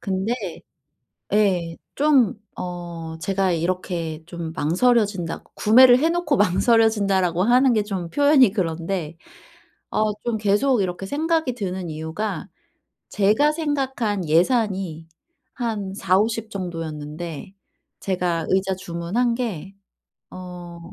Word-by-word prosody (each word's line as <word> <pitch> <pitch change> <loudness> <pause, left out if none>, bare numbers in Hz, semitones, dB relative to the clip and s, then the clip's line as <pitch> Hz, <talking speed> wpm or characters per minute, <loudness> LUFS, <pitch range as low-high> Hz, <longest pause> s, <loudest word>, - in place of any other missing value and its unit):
근데 195 +3 -1 1.0
예. 185 -5 +1 0.2
좀 275 -7 +3 0.3
어 170 -2 -6
제가 195 0 0
이렇게 170 -2 -3
좀 170 -2 -6
망설여진다 190 +2 +1
구매를 245 +3 +6
해 320 - +3
놓고 340 -4 0
망설여진다라고 200 -4 +2
하는 250 +3 +4
게 215 -2 +2
좀 185 -5 -4
표현이 285 - +5
그런데 170 -3 -3 0.8
어 215 0 +1
좀 235 -2 -1
계속 215 +5 +2
이렇게 185 0 -3
생각이 315 0 0
드는 190 -5 -4
이유가 160 +5 -4 0.6
제가 215 +9 +3
생각한 265 - -2
예산이 185 -2 +1 0.5
한 215 -6 -3
40-50 215 +4 +1
정도였는데 165 -2 -6 0.5
제가 175 -4 -1
의자 190 0 +1
주문한 185 +7 -1
게 200 -7 -4 0.6
어 180 -2 -9
195 Hz, 220 characters per minute, -22 LUFS, 170-230 Hz, 1.0 s, 구매를